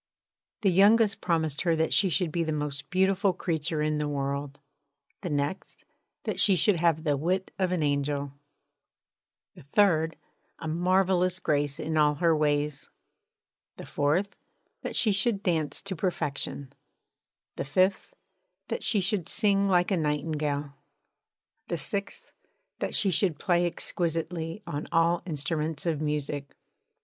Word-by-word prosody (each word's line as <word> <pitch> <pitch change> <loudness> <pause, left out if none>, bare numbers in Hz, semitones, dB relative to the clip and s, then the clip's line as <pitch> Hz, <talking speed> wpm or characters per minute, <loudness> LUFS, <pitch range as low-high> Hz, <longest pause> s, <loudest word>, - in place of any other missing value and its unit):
The 195 -3 +3
youngest 210 +3 +4
promised 160 -4 0
her 170 -2 +2
that 160 0 +1
she 195 - +3
should 175 -1 0
be 170 +1 0
the 160 - -2
most 150 -1 -4
beautiful 190 +1 +2
creature 160 -3 -2
in 150 0 0
the 150 - -1
world; 140 0 -3 0.6
the 180 - -4
next, 145 +5 -3 0.4
that - - -3
she 195 - +5
should 180 +1 +2
have 165 -2 +2
the 150 -3 +1
wit 180 +6 -1
of 185 -1 +1
an 175 -4 0
angel; 140 -1 -1 1.2
the - - -14
third, 160 +1 +2 0.4
a 160 - -6
marvellous 180 +2 +2
grace 145 -5 0
in 155 +1 -2
all 150 -1 +4
her 165 +1 +3
ways; 150 -1 0 0.9
the - - -8
fourth, 165 +8 0 0.5
that - - -5
she 220 - +3
should 200 +1 +2
dance 160 -5 -1
to 195 -1 -4
perfection; 150 -5 -3 0.8
the - - -3
fifth, 185 - +1 0.5
that - - -2
she 210 -4 +2
should 190 -2 -1
sing 200 -2 +3
like 180 0 +2
a 190 - +2
nightingale; 150 -2 -1 0.9
the 170 - -2
sixth, 200 - -3 0.5
that - - -1
she 195 - +3
should 175 -3 +1
play 175 +1 +2
exquisitely 165 +2 -3
on 145 +1 -4
all 170 +1 +3
instruments 155 0 -2
of 160 -3 -1
music. 145 -2 -3
165 Hz, 140 wpm, -28 LUFS, 150-185 Hz, 1.2 s, she